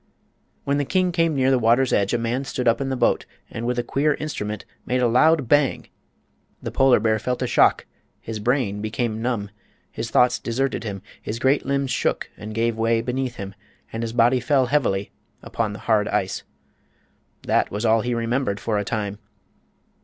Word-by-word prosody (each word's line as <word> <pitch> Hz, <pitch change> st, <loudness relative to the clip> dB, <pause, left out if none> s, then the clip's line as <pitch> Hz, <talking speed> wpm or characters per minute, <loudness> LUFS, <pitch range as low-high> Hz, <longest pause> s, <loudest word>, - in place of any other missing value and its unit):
When 140 Hz, +1 st, 0 dB
the -, -, +1 dB
king 185 Hz, +5 st, +1 dB
came 165 Hz, -2 st, +1 dB
near 135 Hz, 0 st, +3 dB
the 130 Hz, -, +3 dB
water's 120 Hz, +3 st, +3 dB
edge 100 Hz, 0 st, +2 dB
a 120 Hz, -, +2 dB
man 120 Hz, +3 st, -1 dB
stood 125 Hz, -2 st, -3 dB
up 115 Hz, +4 st, +3 dB
in 135 Hz, -, -1 dB
the 130 Hz, -, -1 dB
boat -, -, +1 dB, 0.2 s
and 115 Hz, +1 st, -4 dB
with 125 Hz, 0 st, -1 dB
a 120 Hz, -, 0 dB
queer 145 Hz, +5 st, +1 dB
instrument 105 Hz, -9 st, -5 dB, 0.2 s
made 125 Hz, +1 st, 0 dB
a 125 Hz, -, +3 dB
loud 145 Hz, +4 st, +4 dB
"bang!" 145 Hz, +1 st, +2 dB, 0.7 s
The -, -, -5 dB
polar 135 Hz, -3 st, +4 dB
bear 110 Hz, 0 st, +1 dB
felt 125 Hz, +3 st, -2 dB
a -, -, +1 dB
shock; -, -, +3 dB, 0.3 s
his 110 Hz, -1 st, -6 dB
brain 110 Hz, -3 st, 0 dB
became 110 Hz, 0 st, -2 dB
numb; 115 Hz, -4 st, -2 dB, 0.4 s
his 115 Hz, -, -5 dB
thoughts 125 Hz, +1 st, +3 dB
deserted 130 Hz, +3 st, -2 dB
him; 100 Hz, -3 st, -5 dB, 0.2 s
his 110 Hz, -, -4 dB
great 130 Hz, +4 st, +1 dB
limbs 140 Hz, -1 st, 0 dB
shook -, -, -1 dB
and 105 Hz, 0 st, -8 dB
gave 115 Hz, 0 st, 0 dB
way 115 Hz, 0 st, +2 dB
beneath 125 Hz, +1 st, -2 dB
him 100 Hz, -2 st, -7 dB, 0.4 s
and 115 Hz, -, -3 dB
his 115 Hz, -1 st, -3 dB
body 120 Hz, +2 st, +3 dB
fell 135 Hz, 0 st, +2 dB
heavily 120 Hz, -8 st, 0 dB, 0.3 s
upon 110 Hz, -3 st, -2 dB
the 105 Hz, -, -7 dB
hard 110 Hz, -2 st, +3 dB
ice. -, -, -1 dB, 1.0 s
That -, -, +1 dB
was 105 Hz, +3 st, -3 dB
all 110 Hz, 0 st, +4 dB
he 120 Hz, +1 st, -1 dB
remembered 115 Hz, -3 st, -1 dB
for 105 Hz, -2 st, -1 dB
a -, -, -1 dB
time. 105 Hz, -1 st, -3 dB
120 Hz, 190 wpm, -23 LUFS, 110-130 Hz, 1.0 s, loud